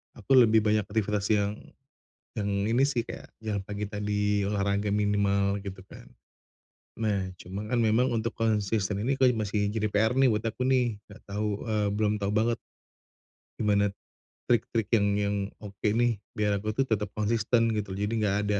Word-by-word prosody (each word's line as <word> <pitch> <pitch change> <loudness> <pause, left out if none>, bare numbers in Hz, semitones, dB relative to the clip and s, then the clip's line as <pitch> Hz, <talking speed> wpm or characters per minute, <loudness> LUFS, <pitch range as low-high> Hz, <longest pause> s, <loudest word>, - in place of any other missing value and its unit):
aku 115 +3 -8
lebih 110 -2 +5
banyak 105 -1 +1
aktivitas 105 -1 -1
yang, 100 0 +1 0.9
yang 100 -1 -1 0.2
ini 130 +3 +4
sih, 120 -4 -1
kayak - - -9 0.2
jalan 105 -2 -1
pagi 105 +1 -4
tadi, 105 -1 0
olahraga 100 0 0
minimal 100 -1 +1
gitu 95 -1 -7
kan. - - -12 0.9
Nah, 100 -4 -1
cuman 100 +5 -6
kan 120 - +3
memang 115 +3 +3
untuk 115 0 -2
konsisten 105 -2 0
ini 130 +5 0
kayak 125 -3 +4
masih 105 0 0
jadi 110 -1 0
PR 110 +3 +2
nih 135 -1 +6
buat 105 0 0
aku 125 +3 -1
nih 120 -5 +1
nggak 105 +1 -14
tahu, 105 +1 -1 0.2
eee 105 -2 0
belum 105 -1 +1
tahu 100 - -1
banget 115 +2 +2 1.0
gimana 105 -2 +3 0.6
trik-trik 115 -2 +1
yang 100 -2 +3
yang 100 0 0 0.2
oke 100 -2 -11
nih 115 -2 +1
biar 105 -2 0
aku 105 +1 -2
tuh 130 +4 0
tetap 105 -2 -1
konsisten 115 +2 +1
gitu. 105 -2 -3
Jadi 105 +3 -2
nggak 100 -1 +2
ada 105 -1 +1
105 Hz, 170 wpm, -28 LUFS, 100-115 Hz, 1.0 s, nih